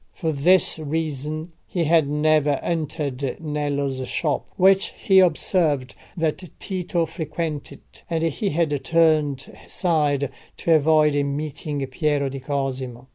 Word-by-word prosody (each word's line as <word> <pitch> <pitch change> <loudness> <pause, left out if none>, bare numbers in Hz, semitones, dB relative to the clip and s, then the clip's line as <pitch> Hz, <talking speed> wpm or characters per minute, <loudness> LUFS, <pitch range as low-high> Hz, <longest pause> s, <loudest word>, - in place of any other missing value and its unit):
For 160 -3 -2
this 165 +4 +3
reason 155 +1 -3 0.2
he 175 - -1
had 160 -2 +3
never 150 -1 +2
entered 145 -5 -3
Nello's 145 -4 -2
shop, 150 0 -1
which 195 +1 +4
he 190 -1 +4
observed 155 -6 +2 0.2
that 160 +2 -1 0.2
Tito 180 -3 -1
frequented, 160 -2 -5 0.3
and 165 -1 -1
he 165 +5 -1
had 150 -3 0
turned 155 -4 +2
aside 150 -6 0 0.3
to 165 - +2
avoid 155 -1 +4
meeting 145 0 -3
Piero 140 +1 0
di 135 +1 -6
Cosimo. 130 -2 -4
150 Hz, 120 wpm, -23 LUFS, 140-165 Hz, 0.3 s, which